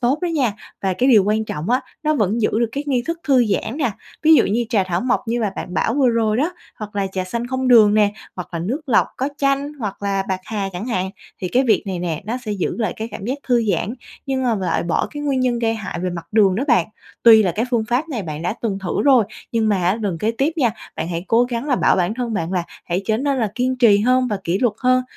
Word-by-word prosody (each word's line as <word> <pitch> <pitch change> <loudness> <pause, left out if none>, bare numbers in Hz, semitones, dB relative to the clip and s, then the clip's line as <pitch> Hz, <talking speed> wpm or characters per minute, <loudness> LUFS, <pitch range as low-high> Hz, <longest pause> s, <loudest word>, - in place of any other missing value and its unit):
tốt 260 +4 +1
đó 360 - -1
nha. 280 -9 +1 0.3
Và 190 - +1
cái 250 +9 +1
điều 215 -6 +6
quan 215 +1 +1
trọng 160 +2 -4
á, 255 - +3 0.2
nó 305 0 +2
vẫn 220 -2 0
giữ - - +2
được 235 - +2
cái 280 - -2
nghi 255 -4 +1
thức 335 0 -2
thư 260 -4 +4
giãn 220 +4 -1
nè. 275 -6 0 0.3
Ví 320 +1 +7
dụ - - +5
như 230 +4 0
trà 205 -6 +2
thảo 180 -1 -1
mộc 255 0 +1
như 240 +1 0
mà 215 -3 0
bạn 180 - -6
bảo 225 - +1
vừa 270 -3 +3
rồi 225 -2 +1
đó, 310 +7 0 0.3
hoặc 210 -2 -7
là 195 -1 0
trà 190 -1 -3
xanh 235 +6 -3
không 260 0 -1
đường 215 -4 +7
nè, 210 -1 +3 0.2
hoặc 180 - -6
là 170 - -3
nước 235 - -2
lọc 240 - +3
có 265 - -1
chanh, 275 +1 0
hoặc 205 -5 -5
là 195 -1 0
bạc 190 -1 -1
hà 200 -2 -3
chẳng 185 +7 -5
hạn. 190 -5 -1 0.3
Thì 180 - -2
cái 255 +8 +2
việc 230 - +3
này 185 -2 -3
nè, 170 -2 -3
nó 235 +3 -2
sẽ 210 - -2
giữ 195 -4 -2
lại 220 - 0
cái 220 +1 -4
cảm 195 - -7
giác 260 +5 -2
thư 240 -2 +3
giãn 210 +7 -2 0.3
nhưng 265 -1 -1
mà 245 -3 +2
lại 190 -4 -1
bỏ 170 - 0
cái 295 -1 -6
nguyên 275 -3 0
nhân 245 -2 +1
gây 225 -1 +1
hại 200 -5 -5
về 180 0 -1
mặt 170 -1 -6
đường 200 -4 +4
đó 235 +8 -1
bạn. - - +4 0.4
Tuy 225 -2 +8
là 185 -4 0
cái 215 +7 -1
phương 230 -3 +1
pháp 250 +8 -1
này 240 -9 -3
bạn 155 -2 -6
đã 180 +4 -1
từng 205 -4 -1
thử 190 -3 -2
rồi, 260 -6 +5 0.3
nhưng 225 -2 +1
mà 205 - +3
á, 185 +5 +2
gần 185 -6 -2
kế 220 +5 0
tiếp 285 +4 +2
nha, 245 -7 +3 0.3
bạn 160 - -3
hãy 170 +1 -4
cố 235 +2 +4
gắng 245 +3 -4
là 255 - +2
bảo - - +3
bản 180 +3 0
thân 235 -2 -3
bạn 165 -1 -2
là 180 -2 0 0.2
hãy 180 +3 -2
trở 220 - +2
nên 275 +2 0
là 220 -4 +1
kiên 255 +1 0
trì 225 -5 +5
hơn 255 +3 +3
và 210 - -1
kỷ 175 +4 0
luật 235 -4 +1
hơn, 255 0 +3
225 Hz, 280 wpm, -20 LUFS, 195-255 Hz, 0.4 s, Tuy